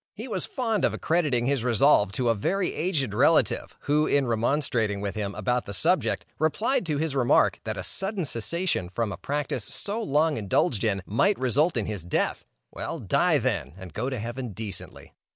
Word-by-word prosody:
He 225 +5 -7
was 200 -7 -2
fond 225 -5 -1
of - - +2
accrediting 150 -8 +1
his 135 -3 +1
resolve 120 -4 +4
to 120 +3 0
a - - +5
very 180 - -1
aged 155 - -1
relative, 145 +9 +2
who, 150 +2 +2
in 140 -1 +3
remonstrating 115 -3 0
with 100 -1 -3
him 100 -2 -4
upon 125 0 0
the 100 - -4
subject, 180 - +1
replied 215 - +1
to 150 -3 0
his 155 -1 -1
remark, 120 -6 +3
that 110 -2 -3
a 95 - -4
sudden 195 - -1
cessation 140 - -1
from 105 +3 -2
a 90 - -5
practice 145 +5 -3
so 210 +3 0
long 155 -4 +1
indulged 105 +1 +1
in, 100 -4 0
might 195 - +2
result 135 +5 +2
in 110 - 0
his 105 -6 -4
death: 90 - -1 0.3
"Well, - - -5
die, - - +2
then, - - -2
and 95 -4 -10
go 125 +5 -2
to 130 - -3
heaven 120 +1 -5
decently." 100 -2 -7
130 Hz, 190 wpm, -26 LUFS, 105-160 Hz, 0.3 s, a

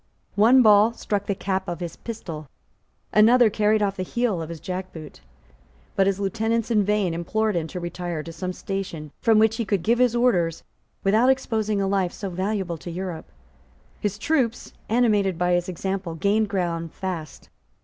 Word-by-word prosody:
One 240 +5 +6
ball 215 +1 +6
struck 205 -3 -3
the 200 - 0
cap 190 0 -2
of 175 -1 -4
his 170 -2 -5
pistol: 165 -10 -7 0.7
another 225 +2 +6
carried 210 0 +2
off 200 0 -1
the - - -2
heel 215 -1 -1
of 160 - -6
his 165 -1 -7
jackboot: 180 -4 -7 0.8
but 195 - +3
his 195 0 0
lieutenants 225 +3 -1
in 210 -3 +4
vain 205 -3 +1
implored 215 +5 -1
him 165 -2 -1
to 180 - -6
retire 175 -2 -4
to 165 - -8
some 180 +3 -4
station 180 -6 -5
from 225 -1 +4
which 220 +1 +3
he 235 - 0
could 200 -5 -1
give 235 +5 +2
his 250 -2 +3
orders 180 -10 +1 0.4
without 220 +6 +4
exposing 220 -6 0
a 195 - 0
life 190 -2 0
so 195 -3 -5
valuable 185 -2 -2
to 175 - -8
Europe. 175 -1 -5 0.7
His 205 -1 -2
troops, 245 -3 -1 0.2
animated 210 -6 +2
by 180 +1 +1
his 175 +1 0
example, 185 -1 -3
gained 205 +5 +1
ground 170 -4 -2
fast. 175 -5 -6
195 Hz, 175 wpm, -24 LUFS, 175-220 Hz, 0.8 s, One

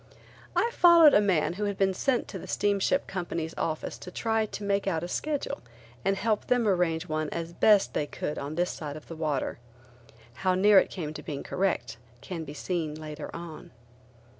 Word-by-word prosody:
I 470 - +2
followed 340 -4 +7
a 205 - +6
man 180 -5 +2
who 205 +3 -2
had 200 -1 -2
been 190 -1 +2
sent 250 +6 0
to 190 - -6
a - - -9
steamship 205 +6 +1
company's 170 -3 -4
office 155 -1 -3
to - - -8
try 225 +3 0
to 205 - -7
make 200 0 0
out 165 -4 0
a - - -3
schedule 295 +9 -3 0.4
and 195 +1 +1
help 215 +1 0
them 245 -3 +2
arrange 180 -3 +1
one 155 -1 -2
as 170 0 -5
best 205 +1 +4
they 145 - -1
could 150 - -4
on 145 +2 -5
this 175 +2 0
side 150 -1 -6
of 155 - -13
the 165 - -7
water. 155 -6 -2 0.8
How 185 -1 +2
near 200 +1 +7
it - - 0
came 155 -5 -5
to - - -7
being 140 -2 -5
correct 125 -12 -1 0.2
can 165 +5 -6
be 145 0 -8
seen 160 -3 -2
later 155 -1 -7
on. 165 -2 -8
180 Hz, 195 wpm, -28 LUFS, 155-205 Hz, 0.8 s, followed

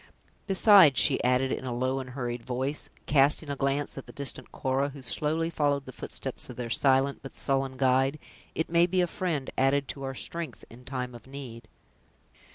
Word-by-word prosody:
Besides," 190 - +7
she 140 - +3
added, 125 +1 +2
in - - -3
a 130 - -4
low 130 +2 0
and 130 -1 -6
hurried 120 -2 -4
voice, 130 +4 -3 0.2
casting 145 +1 +3
a - - -2
glance 140 +1 -1
at - - -12
the - - -10
distant 135 -2 -4
Cora, 135 +2 0
who 140 -1 -11
slowly 160 +6 -1
followed 145 -3 0
the 130 - -8
footsteps - - -3
of - - -7
their 120 -2 -5
silent, 135 +2 +3
but 135 - -10
sullen 135 -1 -1
guide, 135 +2 +2 0.4
"it 160 - -1
may 170 +1 +4
be 185 0 +1
a - - +3
friend 165 -5 -3
added 135 +1 +2
to 140 - -6
our 135 0 -4
strength, 170 +4 -6
in 125 +2 -14
time 125 -2 -4
of 120 +1 -12
need." 125 -5 -9
135 Hz, 190 wpm, -28 LUFS, 130-145 Hz, 0.4 s, Besides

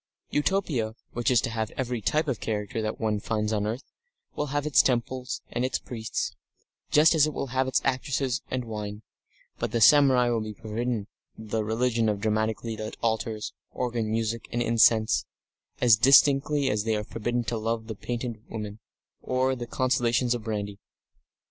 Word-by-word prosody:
Utopia, 145 - 0 0.2
which 120 0 0
is 125 -2 +5
to 115 - -2
have 110 -1 -2
every 125 -3 -2
type 155 +8 +1
of 130 -6 -1
character 110 +2 -3
that 110 0 -3
one 110 -2 0
finds 105 0 -1
on 105 -1 0
earth, 115 +5 -3 0.5
will 150 - -1
have 145 +1 -1
its 150 - +5
temples 125 0 -1
and 120 - -1
its 130 - 0
priests, 110 -3 -4 0.5
just 155 +3 +6
as 155 -2 +4
it 155 - -4
will - - -2
have 130 0 +1
its 130 - +1
actresses 130 -1 0
and 130 -1 -2
wine, 105 -1 -6 0.6
but - - -1
the 115 - 0
samurai 130 0 +6
will 115 -2 0
be 110 0 -5
forbidden 110 +1 -3 0.3
the 110 0 -2
religion 115 +1 +1
of 105 -1 -1
dramatically 110 +1 -1
lit 110 0 -6
altars, 110 -1 -1 0.2
organ 120 -3 -2
music, 115 +1 -2
and 120 0 0
incense, 115 -2 +3 0.5
as 120 -4 +6
distinctly 140 +3 +5
as 105 -1 0
they 110 0 0
are 105 - -2
forbidden 120 +3 -2
the 115 0 -2
love 110 0 -2
of 110 -3 -7
painted 120 -2 -4
women, 105 -1 -6 0.4
or 130 +1 +1
the 120 -1 -6
consolations 125 -1 +1
of 120 -2 -4
brandy. 105 -2 -4
115 Hz, 175 wpm, -27 LUFS, 110-130 Hz, 0.6 s, just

